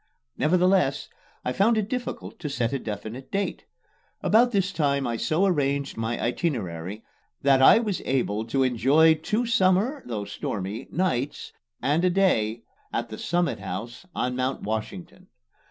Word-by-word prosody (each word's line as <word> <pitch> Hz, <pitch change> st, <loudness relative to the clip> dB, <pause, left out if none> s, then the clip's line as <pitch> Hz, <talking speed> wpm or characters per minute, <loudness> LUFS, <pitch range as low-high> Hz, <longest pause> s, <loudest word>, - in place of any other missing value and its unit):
Nevertheless, 180 Hz, -3 st, +2 dB, 0.4 s
I 125 Hz, -, 0 dB
found 220 Hz, -, +3 dB
it 210 Hz, -2 st, 0 dB
difficult 245 Hz, -2 st, -5 dB
to 150 Hz, -, -4 dB
set 120 Hz, -3 st, -1 dB
a 135 Hz, -, 0 dB
definite 110 Hz, +4 st, -6 dB
date. 200 Hz, 0 st, -2 dB, 0.6 s
About 240 Hz, +3 st, +4 dB
this 195 Hz, -3 st, +1 dB
time 140 Hz, -5 st, 0 dB
I 120 Hz, -1 st, -1 dB
so 155 Hz, -, +1 dB
arranged 140 Hz, -6 st, 0 dB
my 115 Hz, +1 st, -2 dB
itinerary 105 Hz, -, -2 dB, 0.4 s
that 135 Hz, -1 st, +5 dB
I 135 Hz, -, +8 dB
was 215 Hz, -5 st, -1 dB
able 110 Hz, -5 st, 0 dB
to 135 Hz, +4 st, +1 dB
enjoy 135 Hz, +6 st, +4 dB
two 210 Hz, +10 st, -1 dB
summer 215 Hz, +4 st, +2 dB
though 105 Hz, -4 st, -3 dB
stormy 100 Hz, +6 st, -4 dB
nights 150 Hz, -7 st, -2 dB, 0.3 s
and 150 Hz, +5 st, +2 dB
a 185 Hz, -, +4 dB
day 120 Hz, -, +1 dB, 0.3 s
at 120 Hz, 0 st, -2 dB
the 110 Hz, -, -7 dB
Summit 175 Hz, 0 st, 0 dB
House 120 Hz, +10 st, -6 dB
on 125 Hz, 0 st, -1 dB
Mount 130 Hz, +1 st, -2 dB
Washington. 105 Hz, -4 st, -5 dB
140 Hz, 150 wpm, -25 LUFS, 115-185 Hz, 0.6 s, I